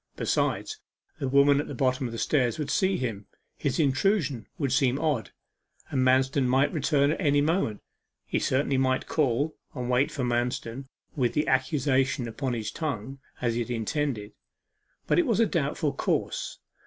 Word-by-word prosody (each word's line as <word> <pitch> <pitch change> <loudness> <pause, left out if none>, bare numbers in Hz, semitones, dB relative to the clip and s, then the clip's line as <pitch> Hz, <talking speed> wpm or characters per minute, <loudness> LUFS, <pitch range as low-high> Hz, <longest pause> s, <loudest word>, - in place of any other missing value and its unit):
Besides, 435 - -1 0.4
the 140 - -1
women 140 +1 +5
at - - -7
the 145 - -6
bottom 130 +1 +1
of - - -7
the 115 - -5
stairs 125 -2 +1
would 145 -2 -3
see 190 +5 +2
him 110 -5 -4 0.3
his 140 +1 -2
intrusion 145 - +1
would 140 -4 -1
seem 135 -1 +2
odd 150 -8 0 0.6
and 130 - +1
Manston 130 +1 +3
might 135 +3 +2
return 145 -2 +2
at 160 - -2
any 145 -4 +3
moment. 150 - 0 0.4
He - - -1
certainly 135 +1 +1
might 130 0 +1
call, 145 +1 0 0.2
and 125 -2 -3
wait 130 +4 +3
for 140 - -3
Manston 120 +1 -2 0.3
with 125 -4 +1
the 150 - +1
accusation 130 -1 +1
upon 125 +3 -3
his 110 -3 -3
tongue, 135 -4 -4 0.2
as 120 -2 +1
he 120 - -1
had 120 - -3
intended. 115 -1 -2 0.7
But - - +3
it 345 - +2
was 230 -3 +2
a 230 - +5
doubtful 150 -5 -1
course. - - -2
135 Hz, 170 wpm, -27 LUFS, 125-145 Hz, 0.7 s, women